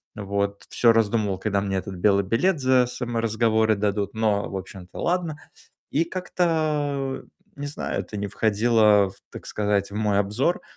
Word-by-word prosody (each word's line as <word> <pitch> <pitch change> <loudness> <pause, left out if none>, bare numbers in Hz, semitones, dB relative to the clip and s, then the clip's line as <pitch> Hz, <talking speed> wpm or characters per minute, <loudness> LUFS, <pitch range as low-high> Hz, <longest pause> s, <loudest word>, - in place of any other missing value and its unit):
Вот. 100 -1 -2
Всё 115 - +4
раздумывал, 110 -3 +1
когда 100 0 0
мне 100 -1 -1
этот 95 +1 -5
белый 100 +2 +3
билет 150 - +1
за 130 -1 +4
саморазговоры 115 -2 +1
дадут. 100 -1 -1
Но, 110 -2 0
в - - -6
общем-то, 95 -1 -9
ладно. 170 -3 0 0.6
И 160 - +2
как-то 155 -6 -1 0.3
не 145 - -5
знаю, 145 - -3
это 105 - -7
не 100 0 -3
входило 105 -1 +3
в, - - -16 0.2
так - - -10
сказать, 105 -1 0
в - - -9
мой 105 -1 +1
обзор, 110 - 0
110 Hz, 155 wpm, -24 LUFS, 100-130 Hz, 0.6 s, Всё